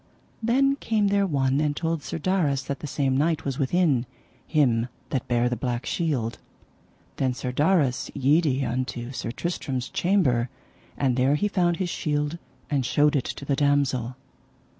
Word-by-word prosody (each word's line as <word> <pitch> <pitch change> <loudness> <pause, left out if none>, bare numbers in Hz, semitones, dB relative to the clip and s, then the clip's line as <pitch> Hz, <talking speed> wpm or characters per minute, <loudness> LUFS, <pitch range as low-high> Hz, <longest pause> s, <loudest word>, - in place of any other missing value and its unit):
Then 270 +5 +3
came 215 -6 +1
there 200 0 +2
one 135 -3 +1
and 150 -1 0
told 165 -1 -1
Sir 145 - -5
Darras 155 -6 +1
that 140 - -4
the 150 - -6
same 135 -1 0
knight 160 +3 +1
was 135 0 -2
within, 140 -4 +2 0.4
him 125 -7 +2 0.2
that 130 - -1
bare 120 0 +2
the 125 - 0
black 120 +1 -3
shield. 135 -10 -1 0.8
Then 130 -2 0
Sir 125 0 -3
Darras 145 -2 +2
yede 140 0 +2
unto 125 0 -3
Sir 125 -3 -4
Tristram's 130 -2 -3
chamber, 135 -11 +2 0.5
and 130 -3 +1
there 130 +3 +3
he 205 +8 +1
found 175 -4 +1
his 185 -2 -2
shield 150 +1 -1 0.3
and 140 -3 0
showed 145 +4 +3
it 135 - +1
to 140 - -6
the 140 - +1
damosel. 135 -4 +1
140 Hz, 160 wpm, -25 LUFS, 130-165 Hz, 0.8 s, Then